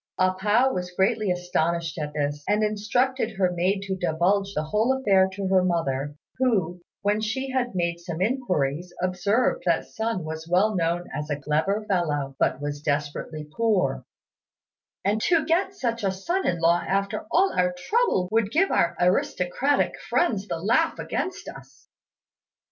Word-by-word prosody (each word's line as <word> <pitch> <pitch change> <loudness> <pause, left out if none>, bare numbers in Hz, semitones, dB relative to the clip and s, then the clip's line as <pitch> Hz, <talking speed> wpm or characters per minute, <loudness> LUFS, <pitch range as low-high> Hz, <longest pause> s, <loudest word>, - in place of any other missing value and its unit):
A 185 0 +3
pao 215 +7 +2
was 180 0 -3
greatly 200 +3 +1
astonished 170 -2 -1
at 150 -1 -4
this, 145 0 -2
and 210 +1 +2
instructed 220 +3 0
her 185 -2 +2
maid 185 +3 0
to 195 -1 -2
divulge 185 +3 0
the 150 - 0
whole 220 +11 +1
affair 195 -6 +4
to 195 0 -3
her 190 -1 +4
mother, 145 -5 -1 0.2
who, 190 -9 +1 0.2
when 205 +1 +1
she 265 +5 -2
had 245 -5 -1
made 170 -1 -1
some 170 -1 -6
inquiries, 180 - -1
observed 185 +7 +1
that 170 -1 +2
Sun 220 -5 -3
was 160 +1 -6
well 200 +4 +3
known 170 0 0
as 150 +1 -4
a 145 -1 -2
clever 160 +9 0
fellow, 145 -7 -1
but - - +1
was 145 0 -4
desperately 150 +1 -3
poor, 220 -5 +1 1.0
and 210 +2 +1
"to 330 +1 +2
get 365 +4 +1
such 235 - -2
a 195 - +2
son 345 - -2
in 170 - 0
law 170 +1 +3
after 200 +11 -1
all 380 +3 +3
our 180 0 +2
trouble 190 - +1
would 225 -2 +2
give 345 - +2
our 170 - +2
aristocratic 180 +8 +1 0.2
friends 210 - +1
the - - -2
laugh 235 - +2
against 370 - -4
us." - - -12
190 Hz, 160 wpm, -25 LUFS, 170-225 Hz, 1.0 s, affair